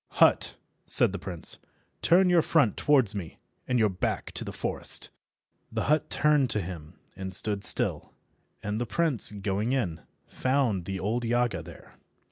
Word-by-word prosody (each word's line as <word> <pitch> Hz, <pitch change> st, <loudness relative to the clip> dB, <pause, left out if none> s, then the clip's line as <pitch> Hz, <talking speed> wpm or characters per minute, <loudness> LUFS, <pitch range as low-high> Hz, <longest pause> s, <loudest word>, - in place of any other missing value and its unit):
"Hut," -, -, +3 dB, 0.3 s
said -, -, +4 dB
the 100 Hz, -, -5 dB
prince, 90 Hz, -2 st, -5 dB, 0.4 s
"turn 180 Hz, +2 st, +4 dB
your 175 Hz, -2 st, +4 dB
front 150 Hz, -10 st, +2 dB
towards 130 Hz, -8 st, +2 dB
me 95 Hz, -6 st, -7 dB, 0.3 s
and 125 Hz, -, +1 dB
your 110 Hz, -2 st, +3 dB
back 90 Hz, -, -3 dB
to -, -, -4 dB
the -, -, -6 dB
forest." -, -, -1 dB, 0.6 s
The -, -, -2 dB
hut 150 Hz, +1 st, +1 dB
turned 150 Hz, -3 st, +2 dB
to 105 Hz, -, 0 dB
him 85 Hz, -3 st, -8 dB, 0.2 s
and 95 Hz, 0 st, -6 dB
stood 100 Hz, +1 st, +5 dB
still, -, -, -1 dB, 0.5 s
and 105 Hz, +2 st, -3 dB
the 120 Hz, -, -2 dB
prince, 160 Hz, -3 st, +3 dB
going 105 Hz, +3 st, -2 dB
in, 85 Hz, -, -2 dB, 0.2 s
found 130 Hz, -9 st, -1 dB
the 95 Hz, -1 st, -4 dB
old 115 Hz, +6 st, -2 dB
Yaga 120 Hz, -1 st, 0 dB
there. -, -, -15 dB
110 Hz, 160 wpm, -27 LUFS, 95-135 Hz, 0.6 s, stood